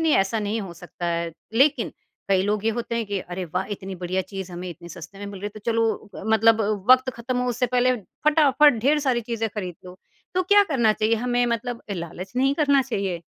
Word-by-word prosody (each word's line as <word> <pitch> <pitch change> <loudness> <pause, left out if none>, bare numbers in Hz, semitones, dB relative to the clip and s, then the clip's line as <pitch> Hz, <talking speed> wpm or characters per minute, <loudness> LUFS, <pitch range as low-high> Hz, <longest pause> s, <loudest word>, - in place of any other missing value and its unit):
नहीं 320 -2 +2
ऐसा 195 +3 +1
नहीं 210 +1 -2
हो 190 -4 -7
सकता 175 +1 -7
है 170 0 -1 0.2
लेकिन 275 +6 +3 0.4
कई 190 -1 +3
लोग 210 +1 -1
ये 225 - +3
होते 235 +1 -3
हैं 230 -2 -2
कि 200 -1 -2
अरे 180 +1 -5
वाह! 180 +3 -2
इतनी 195 -1 -5
बढ़िया 185 +1 -2
चीज़ 190 -1 -7
हमें 180 +1 -6
इतने 170 +1 -11
सस्ते 175 +4 -10
में 205 - -6
मिल 200 -2 -8
रही 205 - -3
है - - -1
तो - - -16
चलो 225 -2 0 0.2
मतलब 225 +1 +5 0.3
वक़्त 255 0 +6
ख़त्म 245 +2 -2
हो 250 0 0
उससे 245 +1 0
पहले 250 +1 +2 0.3
फटाफट 295 -4 +5
ढेर 295 +3 +4
सारी 260 -4 +1
चीज़ें 225 -1 -2
खरीद 185 -4 -4
लो 180 +1 -11 0.4
तो 370 - +2
क्या 410 +3 +6
करना 240 - +2
चाहिए 215 +2 +1
हमें 245 +1 +1
मतलब 235 0 -3
लालच 175 +2 -7
नहीं 270 +2 +3
करना 280 -3 +3
चाहिए? 195 -9 -3
220 Hz, 220 wpm, -24 LUFS, 190-250 Hz, 0.4 s, वक़्त